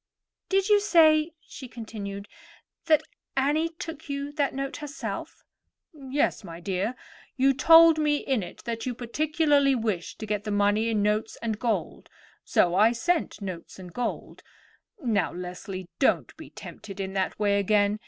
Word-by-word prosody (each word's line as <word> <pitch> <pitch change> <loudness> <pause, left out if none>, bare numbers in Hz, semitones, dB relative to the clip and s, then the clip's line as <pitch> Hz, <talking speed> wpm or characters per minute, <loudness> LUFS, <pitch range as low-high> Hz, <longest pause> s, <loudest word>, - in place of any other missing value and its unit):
"Did 390 0 +2
you 415 -1 +5
say," 320 -4 +4
she 265 - -10
continued, 205 -4 -7 0.6
"that 310 -3 +5 0.3
Annie 295 +5 +2
took 325 -2 -8
you 280 +1 -3
that 290 -2 0
note 275 0 -4
herself?" 295 +1 -6 0.5
"Yes, 275 -4 -1
my 170 -3 -9
dear. 195 +6 -2 0.4
You 270 +1 +4
told 325 +4 +7
me 300 -1 +2
in 265 -5 -1
it 175 - -9
that 230 0 -4
you 250 - -2
particularly 290 +2 +2
wished 215 -8 -2
to 220 - -6
get 210 -1 -2
the 215 - -5
money 205 +2 +2
in 215 -2 +1
notes 210 +1 0
and 220 -2 -2
gold; 235 -2 -2 0.3
so 175 - +2
I 215 +5 +5
sent 320 -3 -1
notes 185 -3 -7
and 180 -2 -11
gold. 245 -1 -4 0.6
Now, 215 -6 +1
Leslie, 180 +1 -6
don't 270 - +2
be - - -11
tempted 200 -2 -10
in 190 0 -3
that 190 -1 -1
way 205 -1 +2
again. 205 +1 +2
230 Hz, 155 wpm, -27 LUFS, 200-295 Hz, 0.6 s, told